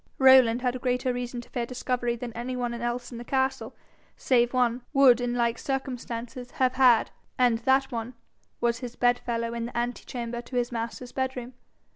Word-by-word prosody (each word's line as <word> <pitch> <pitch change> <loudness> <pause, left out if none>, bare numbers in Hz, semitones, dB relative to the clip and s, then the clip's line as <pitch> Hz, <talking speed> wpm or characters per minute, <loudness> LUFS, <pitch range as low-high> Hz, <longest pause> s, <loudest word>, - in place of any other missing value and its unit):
Rowland 260 -2 +6
had 250 0 -1
greater 250 0 0
reason 245 0 -4
to - - -17
fear 240 -3 -2
discovery 245 -1 -2
than 235 0 -7
any 245 +2 -4
one 245 -1 -2
else 240 +1 -3
in 235 - -7
the - - -6
castle, 265 +1 -1 0.4
save 240 -2 +2
one, 250 -1 +1
would 260 -4 +6
in 245 0 -1
like 235 -1 0
circumstances 245 -2 -4
have 255 -1 +2
had, 255 -3 +4 0.3
and 245 -3 +3
that 265 +3 +2
one 230 +1 -5 0.4
was 235 0 0
his 245 -2 -7
bedfellow 235 -1 0
in 235 0 -3
the 240 - -7
ante 240 +1 -2
chamber 240 -1 -5
to 240 +2 -10
his 245 0 0
master's 235 +1 -5
bedroom. 260 -2 -3
245 Hz, 180 wpm, -27 LUFS, 235-255 Hz, 0.4 s, Rowland